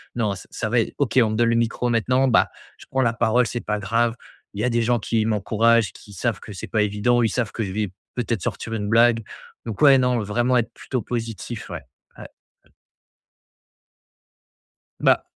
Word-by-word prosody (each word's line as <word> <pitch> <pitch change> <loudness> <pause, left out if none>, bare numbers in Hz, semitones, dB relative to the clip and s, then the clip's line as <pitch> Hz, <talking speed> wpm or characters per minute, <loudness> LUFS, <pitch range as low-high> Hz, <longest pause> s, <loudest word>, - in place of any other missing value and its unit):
«Non 110 -4 0
ç - - -11
ça 110 - -3
va 120 0 +3
ê 115 - -1
OK, 130 -2 +2
on 110 - +3
me - - -2
donne 115 +1 +3
le 115 - +2
micro 115 +1 0
maintenant. 125 +3 +2
Bah, 115 - +4 0.3
je - - -14
prends 130 - 0
la 115 -3 +3
parole, 120 +1 +2
c'est 120 +3 -3
pas 105 0 -2
grave, 115 +3 +1 0.4
il 105 - -4
y - - -1
a 125 - +2
des 120 0 +1
gens 120 0 +2
qui 110 0 0
m'encouragent, 110 +1 +2
qui 105 - -14
savent 105 +2 -2
que 105 - -10
c'est 90 - -7
pas 110 - +1
évident. 105 +4 +2
Ils 110 - +2
savent 120 -5 -2
que 115 - -5
je 95 - -4
vais 105 -1 -1 0.3
peut-être 115 -5 -2
sortir 115 - -4
une 105 -2 -2
blague» 115 0 +4 0.4
donc 110 -4 -6
ouais, 140 -2 +8
non, 125 -2 +2
vraiment 120 +5 0
être 115 - 0
plutôt 130 -3 -4
positif. 115 0 -5
Ouais, - - -6 0.4
ouais. - - -9 2.7
Bah, - - +3
115 Hz, 205 wpm, -23 LUFS, 110-120 Hz, 2.7 s, ouais